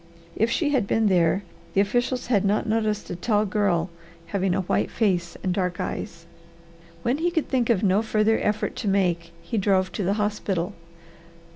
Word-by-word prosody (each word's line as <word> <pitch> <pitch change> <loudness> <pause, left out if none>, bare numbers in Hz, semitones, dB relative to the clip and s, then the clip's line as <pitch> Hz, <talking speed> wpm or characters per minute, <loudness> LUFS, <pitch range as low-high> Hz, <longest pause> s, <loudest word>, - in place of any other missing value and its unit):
If 225 - +2
she 290 +4 +1
had 250 -8 +1
been 220 0 +2
there, 180 +1 +3 0.3
the 195 - +5
officials 245 +4 0
had 215 -6 +2
not 205 +3 +1
noticed 215 -1 -1
a - - -3
tall 210 +3 +1
girl 185 -4 0 0.3
having 190 -1 0
a 190 - +1
white 185 - 0
face 180 -6 0
and 185 - 0
dark 180 -1 -1
eyes. - - -5 0.8
When 250 +4 +1
he 345 +2 +2
could 330 -3 -1
think 250 -3 +1
of 220 -4 +2
no 195 +1 +3
further 220 0 +2
effort 210 0 -1
to 220 - -3
make 175 -4 +1
he 205 +6 -2
drove 190 -1 +2
to 205 - -3
the 190 +2 +1
hospital. 205 -3 -1
205 Hz, 180 wpm, -25 LUFS, 185-225 Hz, 0.8 s, the